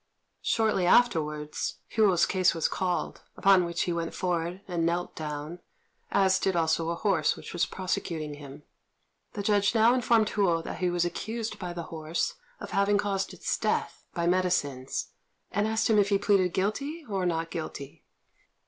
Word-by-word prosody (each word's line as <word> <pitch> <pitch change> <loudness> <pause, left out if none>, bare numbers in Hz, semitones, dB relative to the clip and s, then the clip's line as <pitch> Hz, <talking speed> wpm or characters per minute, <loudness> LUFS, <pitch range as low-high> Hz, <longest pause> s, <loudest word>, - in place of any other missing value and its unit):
Shortly 215 -5 +1
afterwards, 150 -10 +2
Hou's 195 -6 +4
case 185 -2 +2
was 165 - +1
called; 180 -2 -2 0.2
upon 190 -2 +5
which 170 0 -1
he 175 - -1
went 165 -1 -3
forward 175 0 -2
and 175 -3 -1
knelt 170 +1 -1
down, 150 +2 -5 0.5
as 190 -1 +3
did 190 -1 0
also 165 0 +1
a 170 - -1
horse 180 -5 +1
which - - -9
was 175 0 +1
prosecuting 165 -5 -3
him. 145 0 -11 0.7
The 205 - -4
judge 205 +2 +2
now 225 +2 +6
informed 230 -3 +3
Hou 175 -5 +1
that - - -6
he 180 - +1
was 175 0 +1
accused 220 +5 -4
by 180 -2 -4
the 175 -1 -5
horse 160 +1 -2 0.3
of - - -8
having 200 +1 +3
caused 195 -1 -1
its - - -2
death - - -1
by 170 -1 0
medicines, 170 -8 0 0.4
and 205 +2 +1
asked 220 +1 +1
him 220 -2 +4
if 200 -1 +3
he 200 - +4
pleaded 195 -3 +2
guilty 280 - -2
or 190 -4 -1
not 165 -1 -2
guilty. 145 -4 -6
180 Hz, 165 wpm, -28 LUFS, 165-205 Hz, 0.7 s, now